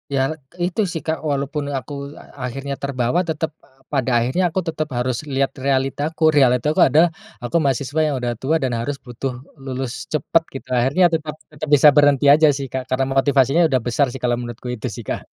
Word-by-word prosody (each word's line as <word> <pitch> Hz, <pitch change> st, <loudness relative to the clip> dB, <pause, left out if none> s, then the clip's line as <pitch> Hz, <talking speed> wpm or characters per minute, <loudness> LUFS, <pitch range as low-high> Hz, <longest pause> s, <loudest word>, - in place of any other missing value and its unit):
Ya, 135 Hz, -, +2 dB, 0.4 s
itu 180 Hz, +5 st, -1 dB
sih, 160 Hz, -, -4 dB
Kak. 160 Hz, 0 st, 0 dB
Walaupun 145 Hz, +1 st, -2 dB
aku 130 Hz, +2 st, -7 dB, 0.3 s
a-akhirnya 135 Hz, +1 st, -6 dB
terbawa, 130 Hz, +2 st, 0 dB
tetap 160 Hz, 0 st, -2 dB
p -, -, -50 dB, 0.3 s
pada 130 Hz, -3 st, 0 dB
akhirnya 130 Hz, +10 st, 0 dB
aku 190 Hz, -, -1 dB
tetap 155 Hz, -1 st, -2 dB
harus 125 Hz, 0 st, -1 dB, 0.2 s
lihat 135 Hz, 0 st, +1 dB
realitaku. 140 Hz, +4 st, -1 dB
Realitaku 135 Hz, +3 st, +3 dB
adalah 160 Hz, +4 st, +4 dB, 0.3 s
aku 120 Hz, -, -4 dB
mahasiswa 140 Hz, +2 st, -1 dB
yang 145 Hz, -, -1 dB
udah 120 Hz, -1 st, -2 dB
tua 150 Hz, +5 st, 0 dB
dan 130 Hz, -, 0 dB
harus 140 Hz, +5 st, -2 dB
butuh 125 Hz, +2 st, -4 dB, 0.3 s
lulus 130 Hz, -2 st, -4 dB, 0.2 s
cepat. 155 Hz, +2 st, +1 dB
Gitu, 135 Hz, -, -9 dB
akhirnya 135 Hz, +9 st, +3 dB
tetap, 155 Hz, -1 st, -2 dB, 0.2 s
tetap 150 Hz, +1 st, -6 dB
bisa 145 Hz, +2 st, +6 dB
berhenti 145 Hz, -2 st, +4 dB
aja 150 Hz, +2 st, +7 dB
sih, 140 Hz, -1 st, -4 dB
Kak, 130 Hz, +1 st, -4 dB
karena 130 Hz, +1 st, +1 dB
motivasinya 135 Hz, +2 st, +3 dB
udah 130 Hz, -, +3 dB
besar 140 Hz, +4 st, +2 dB
sih 135 Hz, -, -7 dB
kalau 120 Hz, -1 st, +2 dB
menurutku. 120 Hz, 0 st, -7 dB
Itu 125 Hz, +2 st, -5 dB
sih, 120 Hz, -, -8 dB
Kak. -, -, -2 dB
135 Hz, 190 wpm, -20 LUFS, 130-150 Hz, 0.4 s, aja